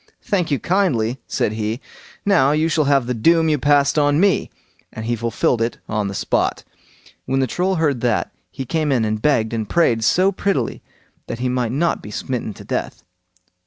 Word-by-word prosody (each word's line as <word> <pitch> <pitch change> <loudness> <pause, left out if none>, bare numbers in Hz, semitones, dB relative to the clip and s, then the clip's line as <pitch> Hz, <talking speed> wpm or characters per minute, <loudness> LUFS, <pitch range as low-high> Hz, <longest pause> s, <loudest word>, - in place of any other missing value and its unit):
"Thank 185 -5 0
you 140 - +1
kindly", 130 - 0
said - - 0
he. 110 +2 -3 0.5
"Now 170 -9 +4
you 155 +2 +1
shall 155 -2 +1
have 140 -3 +3
the 125 - -1
doom 160 +8 +3
you 150 -2 +1
passed 145 +1 +3
on 145 0 +3
me", 195 +1 +2 0.4
and 110 - -7
he 120 +1 0
fulfilled 115 +1 0
it 115 0 -1
on 105 -2 -1
the 100 - -5
spot. - - 0 0.6
When 135 0 0
the - - +2
old 130 - -2
Troll 185 +2 0
heard 145 -7 0
that, 120 -3 0 0.2
he 135 - -6
came 155 +2 0
in 120 -4 +2
and 110 0 -2
begged 115 -6 +1
and 110 -3 -3
prayed 120 -10 +2
so 185 - +3
prettily 185 - -1 0.5
that - - -4
he 125 +1 -1
might 125 -2 -1
not 165 +6 0
be - - -9
smitten 120 +1 -4
to - - -11
death. - - -4
135 Hz, 200 wpm, -20 LUFS, 115-160 Hz, 0.6 s, Now